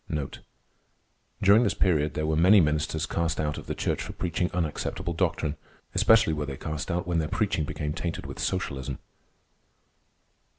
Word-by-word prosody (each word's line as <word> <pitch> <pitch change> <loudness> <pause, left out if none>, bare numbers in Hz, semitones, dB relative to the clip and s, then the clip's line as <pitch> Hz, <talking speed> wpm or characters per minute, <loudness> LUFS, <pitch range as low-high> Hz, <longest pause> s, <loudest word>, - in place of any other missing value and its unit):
During 100 +3 +7
this 120 - +1
period 75 -5 +2
there 75 - -1
were 80 0 +1
many 95 +6 +6
ministers 75 -1 +1
cast 80 -2 -1
out 75 -1 -1
of - - -12
the - - -3
church - - -1
for - - -6
preaching 90 0 -1
unacceptable 85 0 -2
doctrine. 80 -2 -1 0.4
Especially 110 -7 +5
were 75 -1 -3
they 70 -2 -5
cast 75 +2 -4
out 90 0 -1
when 85 -2 0
their 80 - 0
preaching 90 -4 0
became 75 0 -3
tainted 85 -1 -4
with - - -8
socialism. 70 -8 -2
80 Hz, 160 wpm, -27 LUFS, 75-90 Hz, 0.4 s, During